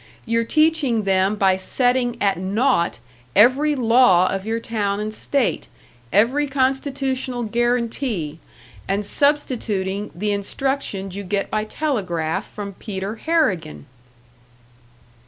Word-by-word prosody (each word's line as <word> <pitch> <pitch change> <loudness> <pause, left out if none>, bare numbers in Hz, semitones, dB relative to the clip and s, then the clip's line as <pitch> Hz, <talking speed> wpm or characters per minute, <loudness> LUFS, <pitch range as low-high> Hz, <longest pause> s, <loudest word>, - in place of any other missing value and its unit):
You're 230 0 +1
teaching 305 -6 +2
them 195 +1 +2
by 190 -2 +3
setting 245 +4 0
at 195 -3 +1
naught 195 - +1 0.4
every 265 +8 +5
law 230 -7 +5
of 195 +2 -4
your 225 +1 -1
town 205 -3 -2
and 215 +1 -3
state, 275 +3 -1 0.4
every 250 +9 +3
constitutional 265 -2 -1
guarantee 235 - -1 0.5
and 200 +1 -1
substituting 210 -9 0
the 205 +4 -1
instructions 200 -2 -2
you 200 - -5
get 200 +1 -2
by 215 0 0
telegraph 185 - -2
from 200 -1 -7
Peter 195 +2 -5
Harrigan!" 210 - 0
220 Hz, 110 wpm, -21 LUFS, 195-260 Hz, 0.5 s, every